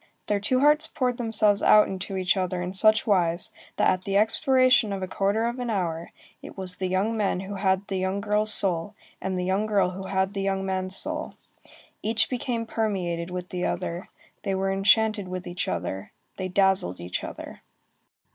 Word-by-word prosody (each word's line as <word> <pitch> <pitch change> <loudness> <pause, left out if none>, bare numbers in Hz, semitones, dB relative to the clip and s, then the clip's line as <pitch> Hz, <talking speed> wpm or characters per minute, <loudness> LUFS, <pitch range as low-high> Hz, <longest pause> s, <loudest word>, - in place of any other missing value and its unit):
Their 205 -1 0
two 255 +6 +1
hearts 300 +2 +4
poured 250 -5 -1
themselves 215 -3 +2
out 210 - +6
into 190 +1 -5
each 185 +1 +1
other 185 -1 -2
in 180 +1 -4
such 215 +2 +4
wise, 175 -4 +2 0.2
that - - +2
at 185 0 +1
the 195 +1 0
expiration 255 +1 +3
of 195 -1 -3
a - - -3
quarter 200 +4 0
of 240 +2 -3
an 245 -1 -3
hour, 170 -5 -2 0.3
it - - -11
was 185 -1 -1
the 185 - -2
young 190 +5 0
man 200 -4 0
who 195 +1 -7
had 190 0 0
the 190 -1 -2
young 190 +1 -1
girl's 210 +1 +2
soul, 190 0 +2 0.3
and 190 0 -2
the 180 - -2
young 195 +3 0
girl 195 -4 +2
who 190 +1 -7
had 190 0 0
the 195 - -3
young 195 0 -1
man's 185 0 -1
soul. 310 +7 -4 0.7
Each 220 +3 0
became 240 -2 -2
permeated 185 -7 -2
with 180 0 -6
the 180 -1 -4
other, 175 0 -4 0.3
they 195 -2 -2
were 195 0 0
enchanted 205 +1 +3
with 180 0 -5
each 175 +1 -4
other, 90 +3 -4 0.3
they 185 - -3
dazzled 190 - +1
each 90 +1 -4
other. - - -8
195 Hz, 195 wpm, -25 LUFS, 185-215 Hz, 0.7 s, out